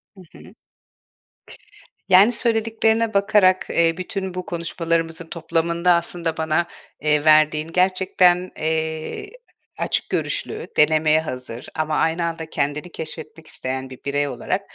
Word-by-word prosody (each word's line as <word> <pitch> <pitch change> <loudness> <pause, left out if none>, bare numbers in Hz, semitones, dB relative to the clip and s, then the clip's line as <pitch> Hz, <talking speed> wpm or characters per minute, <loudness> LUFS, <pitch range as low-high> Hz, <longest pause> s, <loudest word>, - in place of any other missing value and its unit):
Hı 190 - -14 0.2
hı. - - -15 1.6
Yani, 195 +6 +7
söylediklerine 225 -1 +1
bakarak, 200 -2 +3
eee, 165 0 +2
bütün 190 0 -4
bu 180 0 -5
konuşmalarımızın 165 -2 -2
toplamında 170 +1 0
aslında 170 -1 -1
bana, 160 +2 0 0.3
eee, 150 0 +1
verdiğin, 155 0 +4
gerçekten, 185 0 +2
eee, 160 - -2 0.5
açık - - -1
görüşlü, 435 +1 -3
denemeye 155 +1 +4
hazır 125 -5 -7
ama 155 -1 -1
aynı 165 +1 +1
anda 165 -1 -4
kendini 150 +4 -2
keşfetmek 155 0 -8
isteyen 130 0 -5
bir 130 - -11
birey 145 +1 0
olarak - - -3
165 Hz, 120 wpm, -22 LUFS, 155-185 Hz, 1.6 s, Yani